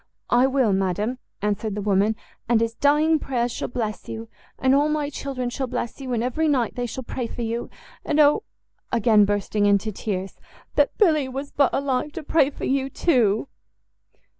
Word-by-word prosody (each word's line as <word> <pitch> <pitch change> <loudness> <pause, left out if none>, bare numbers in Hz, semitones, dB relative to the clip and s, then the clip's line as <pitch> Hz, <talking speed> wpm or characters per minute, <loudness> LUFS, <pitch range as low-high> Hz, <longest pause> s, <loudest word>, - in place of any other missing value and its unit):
"I 245 +2 +5
will, 260 -6 +2
madam," 195 +6 -1 0.2
answered 210 0 -1
the 210 - -3
woman, 205 +2 +2 0.3
"and 235 -2 +4
his 230 0 0
dying 300 +5 +3
prayers 245 -3 -1
shall - - -3
bless 220 -4 -4
you! 225 0 -6 0.3
and 260 0 +3
all 290 +2 +3
my 300 -1 -1
children 255 -4 -4
shall 265 +1 -3
bless 245 +1 -4
you, 260 -1 -5
and 235 -1 0
every 280 +6 0
night 255 -7 +1
they 245 0 -3
shall 260 +2 -6
pray 245 0 -4
for 240 - -5
you. 230 +1 -3 0.3
And 305 - 0
oh!" 300 +7 +5 0.5
again 220 -2 +4
bursting 205 +1 0
into 200 +2 +2
tears, 195 -2 -4 0.3
"that 290 -1 +2
Billy 310 -10 +3
was 275 +2 -5
but 280 -2 +3
alive 275 +1 -1
to 330 - -6
pray 290 -2 +3
for 290 - -6
you 270 0 0
too!" 245 - +2
245 Hz, 185 wpm, -24 LUFS, 220-280 Hz, 0.5 s, I